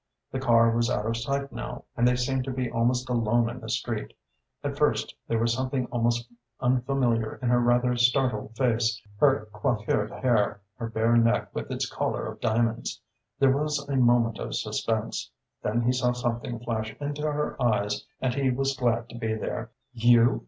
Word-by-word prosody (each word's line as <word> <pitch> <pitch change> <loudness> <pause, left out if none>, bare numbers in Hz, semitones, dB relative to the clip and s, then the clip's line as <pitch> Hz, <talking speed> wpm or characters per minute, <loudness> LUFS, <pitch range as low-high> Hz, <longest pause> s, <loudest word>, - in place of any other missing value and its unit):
The 130 - -2
car 115 -3 +4
was 115 0 +2
out 105 - 0
of 115 +1 0
sight 140 +4 -2
now - - -6
and 120 0 +3
they 125 - +4
seemed 130 +1 0
to 135 - -3
be 125 -2 -2
almost 125 +2 +1
alone 120 -1 +2
in 125 - -8
the - - -8
street. - - -3 0.5
At - - -2
first - - +1
there 115 - +1
was 115 +1 +2
something 130 +1 -1
almost 120 0 0 0.3
unfamiliar 125 -3 +1
in 125 - -2
her 120 0 +4
rather 120 +1 +3
startled 120 -3 +1
face, 115 -3 +1 0.2
her 135 -7 +3
coiffured 105 0 0
hair, 110 -5 +1 0.2
her 115 -1 -4
bare 115 +1 +2
neck 115 +1 +2
with - - -4
its - - -2
collar - - -2
of - - -7
diamonds. 115 +1 0 0.4
There 135 -1 +4
was 150 -1 -1
a 140 - -1
moment 120 -3 +3
of - - -4
suspense. - - -2 0.3
Then 115 +3 0
he 125 - +3
saw 125 -1 +1
something 120 -1 -2
flash 110 -2 -3
into 145 0 -3
her 150 0 -1
eyes 105 -3 +1 0.2
and 130 -2 0
he 135 0 +1
was 135 +2 0
glad 120 -2 0
to 120 - -9
be 110 -1 -1
there. 110 +1 -4 0.2
"You?" 120 +1 +5
120 Hz, 180 wpm, -27 LUFS, 115-130 Hz, 0.5 s, You